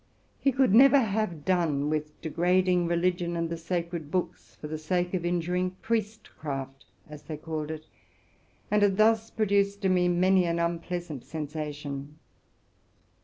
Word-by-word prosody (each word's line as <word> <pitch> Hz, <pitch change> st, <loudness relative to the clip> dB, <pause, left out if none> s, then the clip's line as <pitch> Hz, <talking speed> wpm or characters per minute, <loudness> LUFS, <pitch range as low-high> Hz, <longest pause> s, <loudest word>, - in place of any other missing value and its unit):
He 275 Hz, -, +2 dB
could 260 Hz, -5 st, +3 dB
never 275 Hz, +4 st, +8 dB, 1.0 s
cease 150 Hz, 0 st, -2 dB
degrading 180 Hz, +2 st, +2 dB
religion 175 Hz, 0 st, 0 dB
and 165 Hz, 0 st, -2 dB
the -, -, -1 dB
sacred 170 Hz, -2 st, -4 dB
books, 180 Hz, +2 st, -3 dB
for 150 Hz, -, -8 dB
the 155 Hz, 0 st, -5 dB
sake 175 Hz, +3 st, -1 dB
of 180 Hz, -2 st, -1 dB
injuring 180 Hz, +1 st, -1 dB
priestcraft,' 155 Hz, -12 st, -4 dB, 0.2 s
as 150 Hz, -1 st, -10 dB
they 155 Hz, -, -7 dB
called 155 Hz, -1 st, -4 dB
it, 155 Hz, 0 st, -6 dB, 0.9 s
and 210 Hz, 0 st, +3 dB
had 200 Hz, -2 st, +3 dB
thus 225 Hz, +1 st, +3 dB
produced 200 Hz, -1 st, +1 dB
in 185 Hz, -, +4 dB
me 180 Hz, -1 st, +3 dB
many 180 Hz, +1 st, +3 dB
an 170 Hz, 0 st, 0 dB
unpleasant 170 Hz, -3 st, -3 dB
sensation. 150 Hz, -2 st, -6 dB
175 Hz, 135 wpm, -28 LUFS, 155-190 Hz, 1.0 s, never